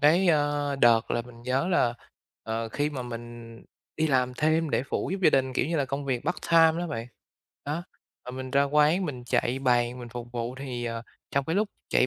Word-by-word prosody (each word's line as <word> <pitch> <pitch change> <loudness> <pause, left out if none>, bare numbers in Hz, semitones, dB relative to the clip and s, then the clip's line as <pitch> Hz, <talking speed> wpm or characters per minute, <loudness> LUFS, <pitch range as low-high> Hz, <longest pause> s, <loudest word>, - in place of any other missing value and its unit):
cái, 170 +5 +5
ơ, 145 -2 +1
đợt 115 -3 +4
là 120 - 0
mình 120 -1 -14
nhớ 130 +7 0
là, 120 -9 +2 0.5
ờ, 115 +1 -3
khi 145 +6 -1
mà 135 -3 -4
mình 120 -1 -8 0.4
đi 160 0 +2
làm 125 -3 +1
thêm 155 +2 +1
để - - +1
phụ - - -1
giúp 195 - -2
gia - - +7
đình, 130 -2 +2
kiểu 130 - +1
như 165 +1 -1
là, 140 - +2
công 140 +1 -4
việc 130 -3 -1
part - - 0
time 165 0 +6
đó 175 - -2
bạn. 120 -8 -4 0.6
Đó, 155 +4 -2 0.4
mà - - -6
mình 130 0 -6
ra 140 +1 +4
quán 150 +6 +3
mình 125 -4 -6
chạy 125 +1 0
bàn 125 -1 +1
mình 120 - -8
phục 120 +1 -8
vụ 120 +1 -3
thì, 125 -3 -4
ờ, 115 -1 -3 0.3
trong 140 0 +1
cái 160 +6 -1
lúc 210 0 +2 0.2
chạy 125 - +3
130 Hz, 225 wpm, -27 LUFS, 120-150 Hz, 0.6 s, gia